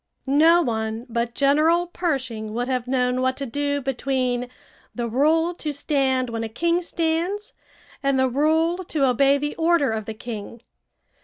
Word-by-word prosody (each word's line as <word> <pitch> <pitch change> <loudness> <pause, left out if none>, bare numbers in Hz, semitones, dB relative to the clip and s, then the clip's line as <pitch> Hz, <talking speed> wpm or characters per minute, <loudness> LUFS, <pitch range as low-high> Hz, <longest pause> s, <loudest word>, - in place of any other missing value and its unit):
No 320 +5 +5
one 220 -2 -3
but 235 0 -2
General 310 +5 +3
Pershing 255 -11 -3
would 245 +1 -1
have 255 -2 -2
known 250 -1 +1
what 260 0 0
to 275 - -3
do 285 +3 -2
between 255 -2 -1 0.5
the 240 -1 -2
rule 315 +8 +2
to 310 -3 -4
stand 265 -4 0
when 225 0 -3
a 225 - -4
king 340 +9 0
stands 345 +4 -2 0.5
and 275 -1 +1
the 260 0 +3
rule 320 +6 +1
to 300 -4 +1
obey 275 +2 +3
the 295 +1 -3
order 325 -5 +2
of 220 -1 -3
the 220 - -6
king. 225 0 -8
270 Hz, 160 wpm, -23 LUFS, 245-320 Hz, 0.5 s, No